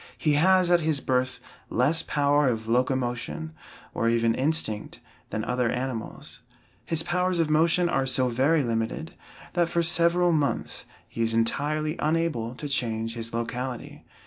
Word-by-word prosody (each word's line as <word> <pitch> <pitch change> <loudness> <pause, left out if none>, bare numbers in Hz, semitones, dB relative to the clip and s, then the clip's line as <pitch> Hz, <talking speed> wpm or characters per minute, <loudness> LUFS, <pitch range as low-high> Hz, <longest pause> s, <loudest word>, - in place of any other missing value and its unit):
He 150 - +1
has 180 +3 +4
at 175 - +5
his 155 -3 0
birth 130 -1 -1 0.3
less 145 +7 +2
power 145 -1 +2
of 110 -3 -2
locomotion, 125 +5 -1 0.4
or 115 - 0
even 115 0 +2
instinct, 130 -6 -2 0.3
than 110 - -3
other 125 +1 0
animals. 125 -2 -5 0.4
His 160 +5 -1
powers 180 +1 0
of 165 -2 +1
motion 165 +3 +3
are 135 -5 0
so 130 0 +2
very 135 +6 +2
limited, 115 +7 -3 0.4
that 175 -2 +1
for 170 0 +1
several 170 +1 +4
months 150 -3 -1 0.2
he 115 - -6
is 115 0 +1
entirely 150 +7 0
unable 155 -7 -1
to 145 - -6
change 115 -4 -1
his 115 -1 -4
locality. 120 +2 -5
140 Hz, 145 wpm, -26 LUFS, 115-160 Hz, 0.4 s, at